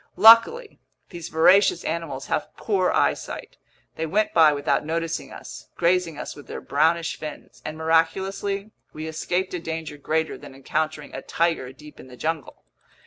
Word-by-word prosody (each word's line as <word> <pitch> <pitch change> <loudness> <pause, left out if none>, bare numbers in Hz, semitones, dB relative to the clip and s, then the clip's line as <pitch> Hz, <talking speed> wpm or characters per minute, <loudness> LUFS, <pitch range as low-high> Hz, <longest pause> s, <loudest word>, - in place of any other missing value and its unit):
Luckily 410 - +6 0.3
these 170 -3 -7
voracious 175 +3 +4
animals 155 -5 -3
have - - -3
poor 190 -4 +1
eyesight. - - -1 0.4
They 160 - -2
went 210 +6 +1
by 160 -2 +7
without 145 -1 0
noticing 165 +1 -3
us, - - -10
grazing 170 -2 +1
us - - -6
with 145 - -13
their - - -6
brownish 165 +3 +1
fins; 150 -1 -9
and 155 0 -6
miraculously, 190 +6 0 0.2
we 155 +1 -6
escaped 175 +4 -2
a 180 - -2
danger 160 -2 -5
greater 160 +3 -1
than 135 - -12
encountering 150 +2 -3
a - - -5
tiger 165 -6 -1
deep 150 +3 -15
in - - -12
the 125 -1 -13
jungle. 160 +1 -4
160 Hz, 155 wpm, -24 LUFS, 155-180 Hz, 0.4 s, by